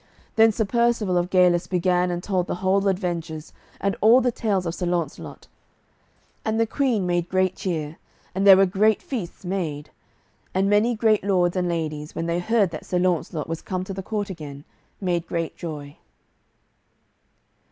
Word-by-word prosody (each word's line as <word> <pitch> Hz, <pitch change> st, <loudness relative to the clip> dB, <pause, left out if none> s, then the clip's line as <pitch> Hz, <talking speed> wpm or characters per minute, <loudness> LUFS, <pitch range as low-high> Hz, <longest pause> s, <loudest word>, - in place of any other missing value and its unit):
Then 225 Hz, 0 st, +6 dB
Sir 220 Hz, +1 st, -1 dB
Percivale 235 Hz, -4 st, +1 dB
of 175 Hz, +1 st, -2 dB
Galis 180 Hz, -2 st, +3 dB
began 180 Hz, 0 st, +1 dB
and 175 Hz, 0 st, -3 dB
told 185 Hz, -3 st, 0 dB
the -, -, -2 dB
whole 195 Hz, +1 st, +3 dB
adventures, 170 Hz, -5 st, -3 dB, 0.3 s
and 200 Hz, 0 st, 0 dB
all 225 Hz, +4 st, +7 dB
the 250 Hz, -1 st, +1 dB
tales 200 Hz, -5 st, -1 dB
of 165 Hz, -, -2 dB
Sir 180 Hz, 0 st, -3 dB
Launcelot. 170 Hz, -4 st, -3 dB, 1.0 s
And 220 Hz, 0 st, -1 dB
the 230 Hz, -, +4 dB
Queen 230 Hz, -4 st, 0 dB
made 175 Hz, -1 st, 0 dB
great 185 Hz, 0 st, +1 dB
cheer, 160 Hz, -4 st, -3 dB, 0.4 s
and 195 Hz, +2 st, +1 dB
there 190 Hz, -1 st, +10 dB
were 195 Hz, -, +6 dB
great 210 Hz, +3 st, +2 dB
feasts 195 Hz, -8 st, -6 dB
made, 160 Hz, -6 st, -3 dB, 0.6 s
and 190 Hz, +1 st, +2 dB
many 210 Hz, +4 st, +3 dB
great 215 Hz, -2 st, +2 dB
lords 180 Hz, -3 st, +2 dB
and 180 Hz, -1 st, 0 dB
ladies, 155 Hz, -2 st, -3 dB
when 165 Hz, -, -2 dB
they 170 Hz, +1 st, 0 dB
heard 205 Hz, 0 st, +2 dB
that 155 Hz, -, -7 dB
Sir 180 Hz, -, 0 dB
Launcelot 175 Hz, -3 st, 0 dB
was 165 Hz, 0 st, -4 dB
come 185 Hz, -1 st, -3 dB
to 195 Hz, -, -6 dB
the 195 Hz, -, -5 dB
court 205 Hz, 0 st, -3 dB
again, 145 Hz, -5 st, -8 dB, 0.4 s
made 175 Hz, -3 st, -1 dB
great 165 Hz, -1 st, -3 dB
joy. 150 Hz, -4 st, -7 dB
185 Hz, 175 wpm, -24 LUFS, 170-200 Hz, 1.0 s, there